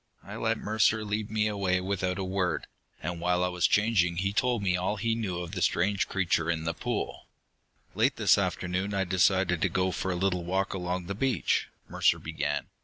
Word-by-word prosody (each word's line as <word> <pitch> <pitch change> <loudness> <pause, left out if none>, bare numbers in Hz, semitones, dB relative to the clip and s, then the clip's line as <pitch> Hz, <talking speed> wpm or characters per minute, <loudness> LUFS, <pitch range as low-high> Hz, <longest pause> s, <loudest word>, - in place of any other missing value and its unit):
I - - -8
let - - 0
Mercer 110 +1 +1
lead 105 0 -2
me 105 0 +1
away 100 -3 +1
without 95 0 -1
a 95 - -2
word. 95 -1 -1 0.4
And 85 +1 -4
while 90 +1 +1
I 90 - +1
was 90 -1 +2
changing, 105 -5 +2
he 100 +2 0
told 125 -2 +1
me 95 -2 +2
all 90 +3 -1
he 115 +2 0
knew 105 -6 -2
of 85 -1 -5
the 95 -2 -4
strange 95 +4 +1
creature 85 -3 0
in 80 -1 -1
the 80 0 -1
pool. - - -4 0.7
"Late - - +2
this - - +5
afternoon 95 +3 -1
I 95 - +2
decided 95 -1 +2
to 95 - +2
go 95 +1 0
for 95 - -3
a 90 - 0
little 90 -1 0
walk 95 +3 -1
along 90 -1 -3
the 100 - -3
beach," 120 -1 0 0.2
Mercer - - +2
began. 75 0 -2
95 Hz, 200 wpm, -28 LUFS, 90-100 Hz, 0.7 s, this